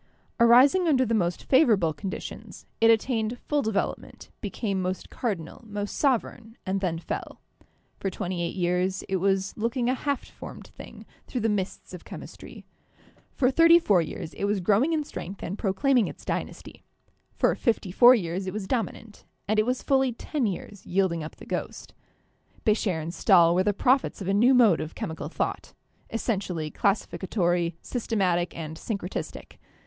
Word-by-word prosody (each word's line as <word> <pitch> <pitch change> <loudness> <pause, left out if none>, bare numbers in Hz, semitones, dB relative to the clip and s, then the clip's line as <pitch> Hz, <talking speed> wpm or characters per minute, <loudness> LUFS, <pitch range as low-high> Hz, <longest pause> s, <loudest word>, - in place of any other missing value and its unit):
Arising 260 +10 +6
under 260 -5 +3
the 230 - -1
most 175 -5 0
favorable 220 - +4
conditions, 190 +5 -7
it 225 - +5
attained 225 0 +1
full 290 +3 -1
development, 215 -4 -3
became 200 -5 -2
most 185 0 -4
cardinal, 190 -10 -4
most 205 -1 -4
sovereign, 235 -4 -1
and 190 +1 -1
then 175 -4 -1
fell. 165 - -6 0.6
For 195 - -1
twenty 180 -1 -4
eight 170 - -3
years 180 +1 0
it 190 - 0
was 195 +1 0
looking 235 +2 -1
a - - +1
half 280 +1 -2
formed - - -10
thing - - -12 0.2
through 250 - -3
the 225 - +1
mists 200 -2 -3
of - - -9
chemistry; - - -10 0.7
for 255 -1 +3
thirty 330 +4 +7
four 205 - +3
years 160 0 -6
it - - -3
was 205 0 +1
growing 210 - +2
in 315 -2 +1
strength 195 -8 -8
and 180 - -3
proclaim 240 +6 +2
ing 210 - +2
its - - -10
dynasty; - - -5 0.5
for - - +2
fifty 220 -5 -1
four 245 +6 +8
years 185 -2 -3
it 185 - -3
was 210 -2 -4
dominant, 225 -1 -4 0.2
and 215 +1 +2
it 215 - +2
was 250 0 -1
fully 265 -2 +2
ten 260 +1 -2
years 200 +1 -6
yielding 180 -3 0
up 155 - -8
the - - -13
ghost. - - -5 0.7
Becher 210 -6 +1
and 160 +2 -5
Stahl 175 -4 +5
were 180 - +3
the 205 - +2
prophets 255 +6 +1
of 190 - -6
a 195 - +1
new 240 +6 +5
mode 225 -9 +5
of 155 - -6
chemical 160 - -5
thought, - - -3 0.3
essentially 190 -9 -2
classificatory, 180 -4 0
systematic, 185 -8 -1
and 160 -1 -6
syncre 200 -3 -4
tistic. - - -7
205 Hz, 170 wpm, -26 LUFS, 180-240 Hz, 0.7 s, four